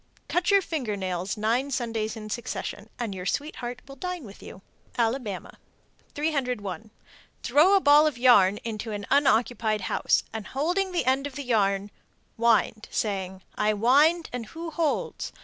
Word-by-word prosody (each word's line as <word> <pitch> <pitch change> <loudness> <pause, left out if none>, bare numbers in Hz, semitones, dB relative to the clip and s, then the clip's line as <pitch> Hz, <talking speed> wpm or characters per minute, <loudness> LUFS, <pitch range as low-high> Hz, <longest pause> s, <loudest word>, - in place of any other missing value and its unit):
Cut 355 0 0
your 400 -1 +5
finger 250 -13 -3
nails 185 +1 -3
nine 235 +6 0
Sundays 225 -4 -2
in 215 -1 -8
succession, 220 -2 -5
and 230 -5 -3
your 185 -1 -5
sweetheart 250 -1 -4
will 275 - -10
dine 360 +2 -5
with 205 -3 -12
you. 190 - -11 0.3
Alabama. 230 -4 -2 0.6
301. 250 - -2 0.5
Throw 300 +10 +5
a - - +6
ball 295 -2 +6
of 295 -6 -2
yarn 210 -6 +5
into 225 -1 -4
an 205 -1 -5
unoccupied 240 -6 +2
house, - - +1
and 220 -3 -5
holding 355 +8 -1
the 350 - 0
end 265 +2 +2
of 275 - -11
the 285 - -4
yarn, 200 -4 +1 0.4
wind, 225 -2 +2
saying, 190 -3 -3
"I 210 0 +1
wind 290 +10 +3
and 240 -3 -4
who 330 +4 -7
holds?" 315 -1 -2
240 Hz, 155 wpm, -26 LUFS, 210-285 Hz, 0.6 s, a